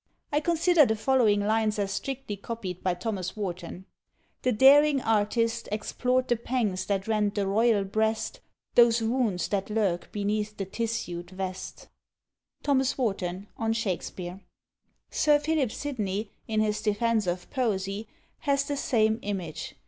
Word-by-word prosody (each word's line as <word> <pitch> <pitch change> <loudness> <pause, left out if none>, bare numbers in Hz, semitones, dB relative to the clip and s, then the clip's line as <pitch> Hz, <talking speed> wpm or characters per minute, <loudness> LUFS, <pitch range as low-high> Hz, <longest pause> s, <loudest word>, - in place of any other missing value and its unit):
I 295 - +3
consider 335 +1 +4
the 220 -5 +2
following 220 -3 +3
lines 215 +1 +1
as 200 -1 -1
strictly 265 +1 -4
copied 195 -3 -6
by 185 -1 0
Thomas 190 +1 -4
Warton: 185 -2 -5 0.6
The 255 - +2
daring 280 +5 +6
artist 230 +1 +1
Explored 250 +4 0
the 240 - +2
pangs 225 -6 -1
that 195 -1 -1
rend 210 -2 +1
the 200 -2 0
royal 210 +1 +3
breast, 220 +3 -1 0.3
Those 235 -1 +5
wounds 225 -6 0
that 200 -1 -1
lurk 200 -5 0
beneath 210 +1 -2
the 195 - -2
tissued 195 -5 -3
vest. 185 0 -6 0.8
T. 290 - 0 0.3
WARTON 195 -5 -2
on 225 0 0
Shakspeare. 185 -3 -4 0.7
Sir 300 -1 +4
Philip 295 -5 0
Sidney, 215 -8 -3 0.2
in 215 -1 +1
his 215 0 0
"Defence 215 0 +1
of 180 +1 -2
Poesie," 205 -4 -1 0.3
has 280 -1 +1
the 285 0 -3
same 220 -4 +2
image. 185 -6 -5
215 Hz, 140 wpm, -27 LUFS, 195-240 Hz, 0.8 s, daring